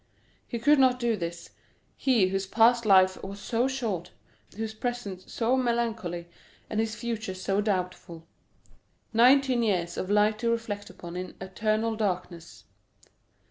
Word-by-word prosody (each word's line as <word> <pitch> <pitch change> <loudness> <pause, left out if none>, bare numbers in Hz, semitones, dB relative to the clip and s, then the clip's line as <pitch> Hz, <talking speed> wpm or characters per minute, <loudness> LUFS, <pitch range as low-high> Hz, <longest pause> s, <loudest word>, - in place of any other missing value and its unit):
He 235 - -4
could 290 +5 +4
not 255 -1 +4
do 235 -2 +1
this, 170 -2 -6 0.4
he 230 -9 +2
whose 195 0 -2
past 230 +2 +4
life 185 -2 +5
was 195 +1 -7
so 235 +4 0
short, 230 -10 -3 0.5
whose 220 0 -3
present 220 -5 -5
so 235 +2 +1
melancholy, 230 -9 -1 0.4
and 215 - -1
his 220 -1 -1
future 220 -4 -4
so 195 +2 0
doubtful. 180 -4 -3 0.9
Nineteen 255 +2 +5
years 180 -6 0
of 185 - -3
light 210 +1 +3
to 235 0 0
reflect 225 -3 -3
upon 175 0 -10
in 180 0 -6
eternal 215 +4 -1
darkness! 180 -5 -4
215 Hz, 140 wpm, -27 LUFS, 185-235 Hz, 0.9 s, life